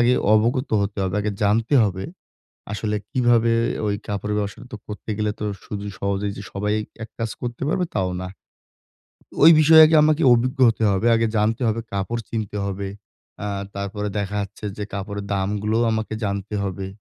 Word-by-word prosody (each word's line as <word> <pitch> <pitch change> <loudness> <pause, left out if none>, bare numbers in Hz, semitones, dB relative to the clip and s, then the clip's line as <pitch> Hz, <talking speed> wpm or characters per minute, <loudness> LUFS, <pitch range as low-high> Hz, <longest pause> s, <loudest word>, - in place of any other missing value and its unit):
আগে 120 +1 +4 0.2
অবগত 120 +5 +1
হতে 100 0 -4
হবে, 95 -1 -2
আগে 105 +1 -1
জানতে 115 +6 +2
হবে, 95 -2 -1 0.7
আসলে 105 0 -2 0.2
কিভাবে 120 -3 +3 0.4
ওই 100 - 0
কাপড়ের 105 +1 -2
ব্যবসাটা 100 +2 -4
তো - - -4
করতে 105 +1 -8
গেলে 105 -1 0
তো, 105 - -3 0.2
শুধু 105 -1 -6
সহজেই 100 0 -1
যে - - -6
সবাই 105 +1 -1 0.3
এক 115 - -9
কাজ 115 -1 -1
করতে 120 0 -5
পারবে, 180 +3 0
তাও 95 -2 +1
না। 95 - -4 1.2
ওই 165 - +10
বিষয়ে 160 +1 +8
আগে 160 +1 +3
আমাকে 155 +1 +3
অভিজ্ঞ 125 +2 0
হতে 110 0 -2
হবে। 100 +4 +1
আগে 115 0 +2
জানতে 110 +4 +1
হবে, 110 +1 0
কাপড় 100 +4 -2
চিনতে 105 -2 -3
হবে। 100 0 -3 0.6
আ - - -2 0.3
তারপরে 100 +1 -3
দেখা 100 0 -2
যাচ্ছে 100 +2 -10
যে 105 - -3
কাপড়ের 100 +1 -4
দামগুলোও 105 +4 0
আমাকে 110 0 -2
জানতে 100 +1 -3
হবে। 95 0 -4
105 Hz, 175 wpm, -22 LUFS, 100-115 Hz, 1.2 s, ওই